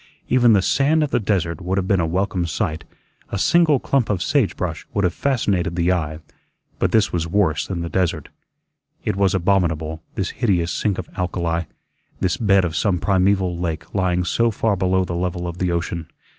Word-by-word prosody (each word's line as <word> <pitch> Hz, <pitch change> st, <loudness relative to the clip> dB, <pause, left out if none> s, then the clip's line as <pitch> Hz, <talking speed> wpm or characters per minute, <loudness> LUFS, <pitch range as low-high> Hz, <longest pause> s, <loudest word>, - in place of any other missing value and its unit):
Even 125 Hz, -2 st, +5 dB
the 100 Hz, -3 st, +3 dB
sand 150 Hz, -, +2 dB
of 145 Hz, -, -2 dB
the -, -, +2 dB
desert 95 Hz, -5 st, -1 dB
would 95 Hz, +2 st, -2 dB
have 95 Hz, -1 st, 0 dB
been 95 Hz, -1 st, +2 dB
a 85 Hz, -, +1 dB
welcome 90 Hz, +1 st, -1 dB
sight; 80 Hz, -2 st, -2 dB, 0.4 s
a -, -, -3 dB
single 155 Hz, -, +4 dB
clump 135 Hz, -3 st, 0 dB
of 95 Hz, -4 st, 0 dB
sage 135 Hz, -9 st, +1 dB
brush 85 Hz, -3 st, -3 dB
would 100 Hz, -, +1 dB
have 90 Hz, -2 st, +1 dB
fascinated 100 Hz, -11 st, 0 dB
the 85 Hz, +1 st, +2 dB
eye; 80 Hz, -4 st, -1 dB, 0.6 s
but -, -, +1 dB
this 110 Hz, -1 st, +2 dB
was 85 Hz, -1 st, -1 dB
worse 85 Hz, -5 st, +1 dB
than 90 Hz, -3 st, -3 dB
the 85 Hz, -, -3 dB
desert. 85 Hz, -4 st, -1 dB, 0.8 s
It 105 Hz, -3 st, 0 dB
was 100 Hz, -1 st, +2 dB
abominable, 85 Hz, -4 st, 0 dB
this 95 Hz, -2 st, -2 dB
hideous 90 Hz, -8 st, 0 dB
sink 100 Hz, 0 st, -1 dB
of -, -, -5 dB
alkali, 85 Hz, -2 st, -1 dB, 0.5 s
this 90 Hz, -, +1 dB
bed 100 Hz, -4 st, +3 dB
of 80 Hz, -2 st, -3 dB
some 95 Hz, 0 st, +1 dB
primeval 95 Hz, -1 st, +1 dB
lake 80 Hz, -4 st, -4 dB
lying 90 Hz, -2 st, +1 dB
so 115 Hz, +5 st, +1 dB
far 110 Hz, -1 st, 0 dB
below 95 Hz, 0 st, +1 dB
the 85 Hz, -, -5 dB
level 90 Hz, 0 st, -2 dB
of 85 Hz, +1 st, -6 dB
the 90 Hz, -1 st, 0 dB
ocean. 85 Hz, -1 st, -3 dB
90 Hz, 195 wpm, -21 LUFS, 85-100 Hz, 0.8 s, Even